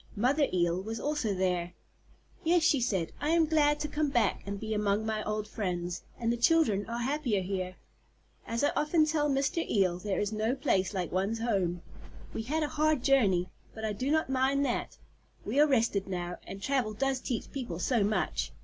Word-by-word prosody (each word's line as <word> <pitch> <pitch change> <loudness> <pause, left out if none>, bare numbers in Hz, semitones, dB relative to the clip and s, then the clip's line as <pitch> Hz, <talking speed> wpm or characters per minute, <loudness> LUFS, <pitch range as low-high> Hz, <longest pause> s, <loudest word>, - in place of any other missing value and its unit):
Mother 270 +7 +2
Eel 175 0 +1
was 225 +3 -5
also 290 -9 -1
there. 180 -2 -1 0.7
"Yes," 340 +1 +3
she 290 -5 +3
said 190 -9 0
"I 295 - 0
am 330 0 +4
glad 295 -1 +3
to 300 - -1
come 300 0 0
back 240 -4 +1
and 200 0 -4
be 220 +1 -3
among 210 0 +1
my 215 -1 -1
old 215 0 -2
friends, 180 -5 -3 0.2
and 235 0 +1
the - - -2
children 235 -7 +3
are 235 - -3
happier 260 -7 0
here. 185 -1 -3 0.7
As 230 +3 -1
I 290 - +3
often 310 +1 +3
tell 305 -1 +1
Mr. 275 +4 +1
Eel, 185 -4 +2
there 200 0 -2
is 205 +1 -1
no 220 +4 0
place 195 -9 0
like 180 -2 -2
one's 195 +5 0
home. 190 -7 -1 0.5
We - - -3
had 305 +8 -1
a - - 0
hard 305 -3 +1
journey, 195 -10 +3 0.3
but 220 0 -4
I 215 - -1
do 255 +7 -2
not 315 +1 +2
mind 265 +2 +2
that. 245 - -2 0.5
We 280 - 0
are 300 - +7
rested 225 -7 +1
now, 180 -2 -4
and 195 - -7
travel 255 -6 0
does 270 +2 0
teach 245 -3 -4
people 245 -11 -4
so 225 +4 +1
much. 210 +1 -1
225 Hz, 195 wpm, -30 LUFS, 195-280 Hz, 0.7 s, are